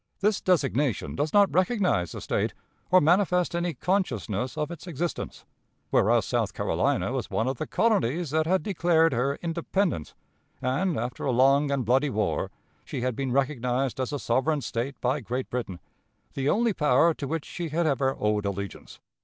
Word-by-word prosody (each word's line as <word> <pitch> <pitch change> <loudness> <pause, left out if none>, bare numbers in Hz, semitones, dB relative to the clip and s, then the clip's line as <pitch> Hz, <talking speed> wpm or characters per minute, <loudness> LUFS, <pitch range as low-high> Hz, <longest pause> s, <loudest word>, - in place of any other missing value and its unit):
This 210 0 +1
designation 145 - +1
does 145 +2 -1
not 205 -1 +4
recognize 185 - +1
the - - -6
State, - - -1 0.3
or 185 - +7
manifest 180 +2 +2
any 170 -2 -1
consciousness 125 - -1
of 150 +2 -2
its 170 +1 -9
existence, 170 +1 -4 0.5
whereas - - +3
South - - -1
Carolina - - 0
was - - -3
one 115 - 0
of 130 -1 -1
the - - -3
colonies 170 - +1
that 155 +1 +1
had 185 -2 +2
declared 165 -4 +2
her 130 +4 0
independence, 170 - -1 0.4
and, 145 +7 0
after 120 +2 -4
a 135 - +1
long 135 +4 +4
and 140 -3 0
bloody 135 +5 +3
war, 105 -4 -1 0.3
she - - -5
had 125 -1 -1
been 135 0 -2
recognized 130 -1 0
as 130 - -1
a 145 - -1
sovereign 140 +4 0
State 120 +3 -3
by 130 +4 +1
Great 125 +2 -4
Britain, 115 -8 -4 0.5
the 135 +1 0
only 230 +3 +2
power 150 +1 +3
to 140 - -5
which 160 +1 -3
she 170 -2 -5
had 165 +3 0
ever 135 -2 +1
owed 105 -1 +1
allegiance. 100 0 -6
140 Hz, 170 wpm, -27 LUFS, 125-170 Hz, 0.5 s, or